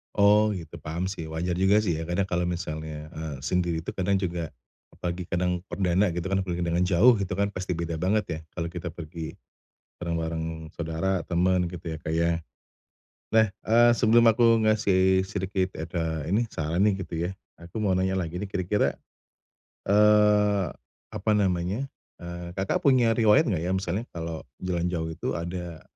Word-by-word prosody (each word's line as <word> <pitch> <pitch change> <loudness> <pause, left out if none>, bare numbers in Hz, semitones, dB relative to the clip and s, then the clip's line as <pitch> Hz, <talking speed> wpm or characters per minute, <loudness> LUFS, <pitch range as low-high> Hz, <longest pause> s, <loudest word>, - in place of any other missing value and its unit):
Oh 105 +1 +5
gitu, 85 -2 -8
paham 80 +4 -4
sih, 85 -5 -5
wajar 85 +2 -2
juga 100 +3 +4
sih 85 -6 0
ya, 80 - -5
kadang 90 +3 +1
kalau 90 0 0
misalnya, 80 -3 -5
eee, 80 -3 -5
sendiri 85 0 0
itu - - -4
kadang 100 +1 0
juga 85 -5 -2 0.4
apalagi 85 0 -4
kadang 90 -1 0
perdana 95 +1 +1
gitu 90 - -3
kan, 95 - +2
pergi 90 -1 -2
dengan 85 +1 +1
jauh 110 +7 +5
gitu 95 -1 -2
kan, 100 +1 0
pasti 95 -2 -3
beda 85 -1 -3
banget 100 +5 +2
ya, 80 - -3 0.2
kalau 85 -1 -3
kita 85 0 -5
pergi 80 -1 -7 0.6
bareng-bareng 80 -1 -3
saudara, 85 +2 -1
temen 90 +1 +2
gitu 85 0 -8
ya, 80 - -5
Kak, 80 - -4
ya. 85 +1 +2 1.0
Nah, 110 0 +6 0.2
eee 120 +2 +5
sebelum 115 +1 +5
aku 115 0 +5
ngasih 95 -3 +3
sedikit 95 -1 -2
ed 80 +1 -5
ah, 80 -2 -1
ini, 105 +6 +2
saran 80 +5 0
nih 100 -2 +2
gitu 90 - -6
ya, 90 - -1 0.3
aku 85 +6 -7
mau 95 -3 +2
nanya 95 +1 +1
lagi 85 -1 -4
nih, 100 +3 -3
kira-kira, 95 +2 +1 1.0
eee, 105 -1 +5 0.4
apa 110 - -1
namanya, 100 +5 0 0.3
eee, 85 0 -7
Kakak 95 +1 -1
punya 125 -4 +5
riwayat 115 +5 +5
enggak 85 -6 -1
ya, 90 - 0
misalnya 95 +3 -2
kalau 80 -1 -5 0.2
jalan 90 -2 -1
jauh 85 -2 -2
itu 80 - -3
ada, 85 -1 -5
90 Hz, 170 wpm, -26 LUFS, 85-100 Hz, 1.0 s, Nah